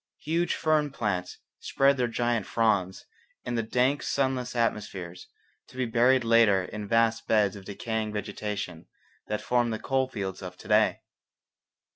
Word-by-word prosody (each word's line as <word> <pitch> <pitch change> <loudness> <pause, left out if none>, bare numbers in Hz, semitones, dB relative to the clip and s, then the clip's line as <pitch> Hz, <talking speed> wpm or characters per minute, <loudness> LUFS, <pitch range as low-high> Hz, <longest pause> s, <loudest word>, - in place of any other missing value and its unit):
Huge 165 +3 0
fern 155 -2 +1
plants 100 -9 -3 0.2
spread 135 0 +2
their 125 -1 +1
giant 120 -2 -1
fronds 100 -5 0 0.4
in 120 - -3
the 115 - +1
dank 125 +5 +1
sunless 130 -2 -1
atmospheres, 100 -6 -2 0.4
to - - -15
be 130 - 0
buried 125 +2 +3
later 115 -4 +4
in 105 +2 -6
vast 115 +1 +2
beds 105 -3 +3
of 100 -2 -11
decaying 110 +2 -3
vegetation 105 -4 -5 0.4
that 105 - -2
form 120 -1 +1
the 110 - -2
coal 130 +2 0
fields 95 -7 -5
of 90 -1 -8
to - - -13
day. - - +3
115 Hz, 150 wpm, -27 LUFS, 100-125 Hz, 0.4 s, later